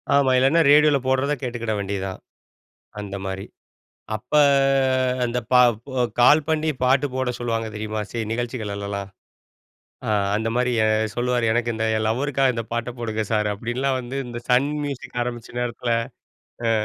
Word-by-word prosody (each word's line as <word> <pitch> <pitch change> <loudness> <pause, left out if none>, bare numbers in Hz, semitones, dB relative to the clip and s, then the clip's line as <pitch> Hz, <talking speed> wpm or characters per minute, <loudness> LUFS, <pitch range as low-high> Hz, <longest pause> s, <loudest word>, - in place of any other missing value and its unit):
ஆமா, 140 -2 +4
இல்லேன்னா 135 +6 +4
ரேடியோல 150 0 +6
போடுறத 130 +2 +1
கேட்டுக்கிட 120 -3 -3
வேண்டியது 100 -1 -3
தான். 95 - -7 0.8
அந்த 100 -1 -6
மாதிரி 95 0 -4 0.7
அப்ப 120 +6 -19 0.9
அந்த 120 0 -1
ப - - +4 0.7
கால் 145 +5 +6
பண்ணி 160 0 +1 0.2
பாட்டு 135 +3 +3
போட 130 -1 0
சொல்லுவாங்க 115 -2 -2
தெரியுமா, 110 0 -3
சி - - -16
சில 110 -2 -3
நிகழ்ச்சிகள்லாம் 100 -4 -4 1.0
அ - - +1 0.2
அந்த 110 +1 -1
மாரி 125 0 +1 0.4
சொல்லுவாரு 120 -1 0
"எனக்கு 120 +1 0
இந்த 110 0 -1 0.2
லவ்வருக்காக 135 +2 +1
இந்த 115 -1 -3
பாட்ட 120 +1 -2
போடுங்க 110 -2 -2
சார்." 105 -1 +1
அப்டின்னுலான் 125 +5 -1
வந்து 125 +2 -5
இந்த 120 -1 -6
சன் 125 +3 +4 0.2
மியூசிக் 140 -3 -6
ஆரம்பிச்ச 120 -2 -6
நேரத்துல. 120 0 -2 0.8
அ. - - +3
120 Hz, 145 wpm, -23 LUFS, 110-130 Hz, 1.0 s, ரேடியோல